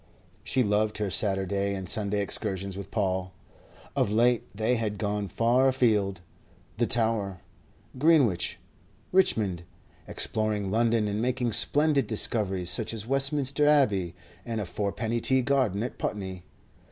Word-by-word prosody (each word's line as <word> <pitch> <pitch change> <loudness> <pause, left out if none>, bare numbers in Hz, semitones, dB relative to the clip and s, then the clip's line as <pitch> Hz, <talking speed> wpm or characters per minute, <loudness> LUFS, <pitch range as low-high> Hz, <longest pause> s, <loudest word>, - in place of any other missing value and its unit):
She 130 -1 +1
loved 105 0 0
her 105 -2 -2
Saturday 100 0 0
and 95 -1 -6
Sunday 105 +1 +1
excursions 100 -1 -3
with 100 0 -7
Paul 95 -3 -2 0.6
of - - +1
late 120 +2 +2
they 110 +4 0
had 105 -2 -3
gone 105 0 -2
far 120 +6 +2
afield: 105 -8 +1 0.6
the 120 0 +1
Tower, 110 -5 0 0.6
Greenwich, 140 - +3 0.5
Richmond 105 - +2 0.5
exploring 105 -3 -1
London 115 0 +2
and 105 +1 -2
making 125 -1 -1
splendid 145 +5 +1
discoveries 95 -5 +2
such 110 +4 -1
as 105 -1 -6
Westminster 140 +2 +2
Abbey 100 - +2 0.3
and 115 0 -4
a 105 - -3
fourpenny 105 +5 -3
tea 130 +1 +3
garden 125 -7 +1
at 125 - -6
Putney. 95 -3 -4
110 Hz, 130 wpm, -27 LUFS, 100-120 Hz, 0.6 s, Greenwich